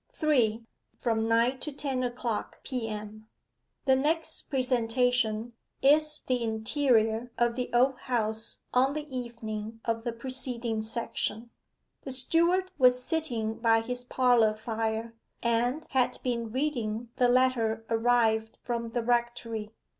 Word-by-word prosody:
3. 240 - +2 0.3
FROM 225 -2 0
NINE 235 +3 +2
TO 300 - -4
TEN 270 -2 -2
O'CLOCK 240 -2 -3
P.M. 215 -3 -5 0.6
The 265 -1 +5
next 315 +5 -1
presentation 245 -3 +1 0.3
is 305 +2 +4
the 250 -1 0
interior 225 0 +1
of 235 0 +2
the 250 -1 -2
Old 250 +2 +3
House 220 -3 -2
on 265 +3 +3
the 305 0 -4
evening 225 -3 -5
of 230 -1 -1
the 240 - -1
preceding 235 -2 -3
section. 225 0 -3 0.5
The - - -7
steward 340 +8 +2
was 250 -1 +5
sitting 240 -9 -2
by 225 -1 +4
his 245 +2 -4
parlour 245 -4 +3
fire, 225 +1 -3 0.3
and 240 +6 +1
had 255 -2 +2
been 235 -3 -2
reading 240 -4 -2
the 250 - +4
letter 245 -3 +2
arrived 225 -1 +2
from 235 -1 -3
the 240 -1 0
rectory. 235 -2 -1
240 Hz, 125 wpm, -29 LUFS, 225-255 Hz, 0.6 s, The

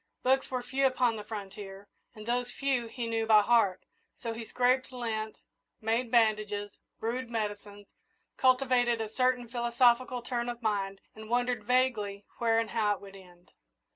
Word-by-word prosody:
Books 265 +1 +2
were 255 -1 -2
few 270 +2 +2
upon 250 -3 +1
the 210 - -6
frontier, 200 -2 -8 0.3
and 215 -1 -10
those 245 +1 -1
few 265 -4 -1
he 235 +1 -5
knew 225 -1 -1
by 215 -2 +7
heart; 205 -5 +3 0.4
so 230 -2 -4
he 230 +1 -6
scraped 255 +3 +1
lint, 220 -3 -3 0.4
made 225 +2 0
bandages, 215 -3 +2 0.3
brewed 235 +2 -3
medicines, 205 -2 -4 0.5
cultivated 255 -2 +3
a 220 -1 -3
certain 250 +1 +1
philosophical 240 +1 +2
turn 240 -1 -2
of 240 0 -6
mind, 195 -2 -1
and 220 0 -11
wondered 245 -2 0
vaguely 220 -5 +1
where 230 -1 +3
and 225 -1 0
how 210 -2 +2
it - - -15
would 195 -1 -12
end. 180 -2 -17
230 Hz, 160 wpm, -30 LUFS, 210-245 Hz, 0.5 s, by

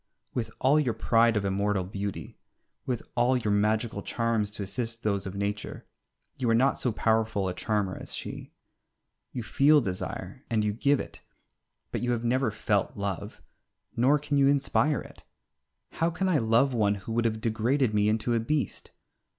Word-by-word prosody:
With 115 -3 -2
all 140 +4 +4
your 125 -7 0
pride 115 0 +3
of 100 - -1
immortal 100 0 0
beauty, 100 +1 -6 0.5
with 125 -3 -2
all 125 +2 +3
your 110 -4 0
magical 105 +1 +1
charms 115 -1 0
to 105 0 -6
assist 115 +4 -4
those 100 -2 0
of 95 - -6
Nature, 100 +1 -4 0.5
you 125 -3 0
are 115 - +4
not 130 +4 +3
so 125 - +1
powerful 110 -2 +1
a 90 - -2
charmer 105 -2 -1
as - - -6
she. - - -7 0.8
You 120 - -4
feel 145 +6 +5
desire, 95 -8 -5
and 110 -2 +1
you 105 - 0
give 140 +5 +2
it, - - -7 0.7
but - - -2
you 120 0 +1
have 115 -1 -2
never 125 +1 +1
felt 105 -2 -1
love, 100 +1 -4 0.5
nor 130 +5 +4
can 145 0 -1
you 135 - +5
inspire 140 +1 +2
it. - - -13 0.7
How 165 - 0
can 190 +3 -1
I 170 -5 +3
love 115 +4 +3
one 105 -3 +2
who 100 +3 -8
would 115 +1 0
have 110 -1 0
degraded 115 +2 +1
me 105 0 +3
into 110 +2 0
a 115 - +2
beast? 140 +5 -2
115 Hz, 175 wpm, -28 LUFS, 105-125 Hz, 0.8 s, feel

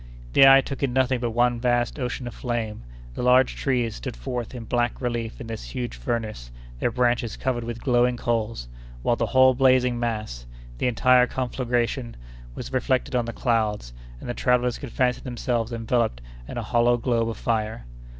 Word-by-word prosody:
The 135 - +8
eye 135 0 +8
took 135 +1 -6
in 135 -3 0
nothing 130 -1 +2
but 120 -1 -1
one 120 +1 +2
vast 120 +2 0
ocean 125 0 -3
of 120 - -6
flame; 115 - -3 0.3
the - - -5
large 125 +1 +4
trees 125 -5 -1
stood - - -6
forth 120 - -5
in 120 - -6
black 120 +1 -1
relief 120 -2 -3
in 125 - -7
this 115 - -6
huge - - -5
furnace, 60 - -4 0.3
their - - +1
branches 120 -1 0
covered 125 -2 -1
with 115 0 -6
glowing 125 -1 +2
coals, 115 - -2 0.4
while 120 - +2
the 115 - -1
whole 130 +3 +5
blazing 130 -2 +3
mass, 110 - -3 0.3
the - - +1
entire 125 +1 +4
conflagration, 120 -1 -2 0.4
was - - -7
reflected 130 0 0
on 120 -1 +1
the 115 - -4
clouds, 110 - -1 0.3
and - - -9
the 120 - -2
travellers 125 0 +1
could 140 -5 -7
fancy 125 0 +1
themselves 120 -2 -2
enveloped 115 - 0 0.3
in - - -7
a - - -2
hollow 120 0 +3
globe 115 -1 0
of 115 - -5
fire. 110 - -2
120 Hz, 180 wpm, -24 LUFS, 115-125 Hz, 0.4 s, The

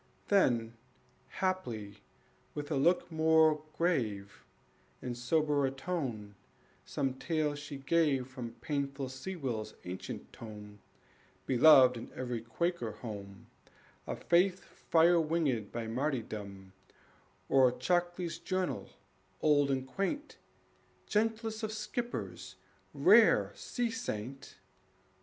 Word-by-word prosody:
Then, 120 - +3 0.5
haply, 120 - -3 0.6
with 145 +1 -5
a - - +1
look 170 +5 +2
more 160 -1 +4
grave, 110 - -1 0.6
And 125 -1 -4
soberer 145 +2 +1
tone, 135 - -4 0.5
some 135 -2 -2
tale 155 -3 0
she 145 0 -7
gave 135 -2 +2
From 125 -3 -7
painful 140 -2 -2
Sewell's 130 - -4
ancient 90 +1 -7
tome, 105 -2 -10 0.7
Beloved 130 -1 +7
in 115 - -8
every 120 -3 -3
Quaker 115 +1 -2
home, 100 -4 -8 0.6
Of - - -5
faith 180 +2 +3
fire 170 +1 +3
winged 150 -9 0
by 115 -1 -4
martyrdom, 110 -7 -4 0.7
Or 130 -2 +5
Chalkley's 175 +6 -1
Journal, 185 -1 -2 0.5
old 145 -2 +3
and 130 -1 0
quaint, 285 - -3 0.7
Gentlest 220 +1 0
of 220 -1 -2
skippers, 225 +3 -5 0.4
rare - - +5
sea 240 -2 -3
saint! 135 - -5
140 Hz, 100 wpm, -32 LUFS, 120-170 Hz, 0.7 s, Beloved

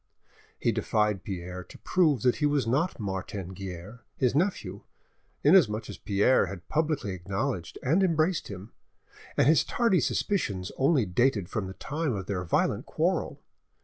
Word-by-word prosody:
He - - +2
defied 105 -2 0
Pierre 90 -1 -6
to - - -13
prove 155 - +2
that 125 - +3
he 150 - +2
was 145 -4 +1
not 140 +9 0
Martin 95 -2 -4
Guerre, 95 +4 -8 0.2
his 125 -3 +2
nephew, 180 +7 -1 0.6
inasmuch 125 - +4
as - - -10
Pierre 100 +2 +3
had 90 -1 -8
publicly 155 -9 0
acknowledged 95 -1 -3
and 160 +9 +3
embraced 165 -1 +1
him, 100 +2 -9 0.7
and - - +4
his 150 +1 +5
tardy 230 -7 +2
suspicions 100 - -1
only 135 -3 +3
dated 100 0 +1
from 105 -5 -3
the 95 - -8
time 150 -2 -2
of 95 -2 -4
their 90 -2 -2
violent 85 - 0
quarrel. - - -1
110 Hz, 150 wpm, -28 LUFS, 95-150 Hz, 0.7 s, his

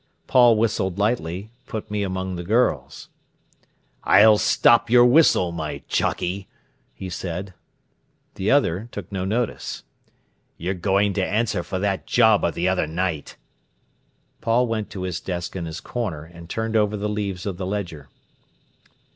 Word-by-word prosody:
Paul 120 -3 +5
whistled 105 -4 0
lightly, 100 -2 -1 0.2
"Put 110 -3 -6
Me 105 -1 -1
among 95 -1 -3
the 85 - -5
Girls". 115 +7 0 0.9
"I'll 105 0 +6
stop 120 0 +4
your 120 +1 +7
whistle, 125 - +4
my 80 -3 -5
jockey!" 95 +2 -1 0.5
he 95 - -7
said. 90 +1 -5 0.8
The 95 +3 -2
other 115 -6 +2
took 100 -2 -8
no 95 -2 -3
notice. 115 +4 -2 0.7
"You're 90 +3 -2
goin' 100 +2 +1
to 95 - 0
answer 110 +4 0
for 95 - -4
that 100 0 -2
job 110 -4 +4
of 85 - 0
the 85 +2 0
other 95 -4 +1
night." 80 -1 -3 1.1
Paul 115 +2 +2
went 110 -3 -3
to 95 - -6
his 90 -2 -3
desk 90 -1 -5
in 90 -3 -3
his 80 0 -6
corner, 95 -11 -4
and 85 +1 -13
turned 110 0 -2
over 105 -1 +2
the 105 +1 -2
leaves 100 -3 -3
of 95 -4 -3
the 90 -1 -4
ledger. 90 -8 -5
100 Hz, 150 wpm, -23 LUFS, 90-110 Hz, 1.1 s, your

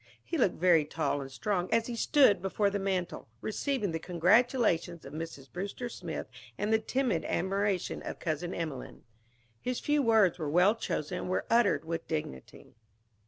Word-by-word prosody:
He - - -4
looked 245 - +2
very 170 -3 +4
tall 150 -1 -1
and 135 0 -8
strong 185 +4 -2
as 230 0 +3
he 240 - -4
stood 260 - +4
before 200 +1 +1
the 200 - -1
mantel, 190 -2 -2
receiving 215 - -1
the 165 - -2
congratulations 180 -1 +2
of 135 - -10
Mrs. 155 -4 -7
Brewster 200 +7 -4
Smith 175 -8 -5 0.3
and 210 +2 0
the 220 - +4
timid 230 -6 0
admiration 195 +1 -1
of - - -6
Cousin 165 +1 -3
Emelene. 155 -8 -5 0.6
His 250 -1 -2
few 295 0 +1
words 220 - +4
were 155 -3 -2
well 180 +7 +5
chosen 180 -6 -3
and - - -5
were 185 - 0
uttered 230 -7 +3
with 165 0 -4
dignity. 150 - -6
185 Hz, 165 wpm, -30 LUFS, 165-220 Hz, 0.6 s, well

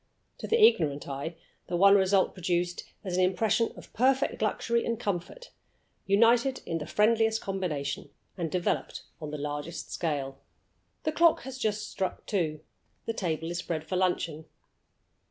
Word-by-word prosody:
To - - -5
the 460 - +2
ignorant 155 - +4
eye 140 +4 -4 0.3
the 175 - -1
one 195 +2 +7
result 190 -1 +3
produced 175 -1 -1 0.2
is 180 -1 -2
an 185 - +4
impression 210 +5 +2
of - - -13
perfect 265 +2 +2
luxury 235 0 +1
and 230 -1 -2
comfort, 205 - -4 0.6
united 235 +6 +4
in 165 -1 -2
the 150 - -6
friendliest 220 +1 +3
combination, 180 -8 -3 0.3
and 170 -3 -2
developed 180 -1 -1 0.2
on 155 - -5
the 150 - -4
largest 145 +3 -5
scale. 140 -4 -3 0.6
The 310 - 0
clock 335 +1 +4
has 265 0 -8
just 210 -3 -1
struck 190 -1 -3
two. 155 -7 -1 0.4
The 225 - -1
table 165 -5 -2
is 175 - -3
spread 165 -3 -3
for 185 - -2
luncheon. 170 -4 0
185 Hz, 155 wpm, -29 LUFS, 165-225 Hz, 0.6 s, one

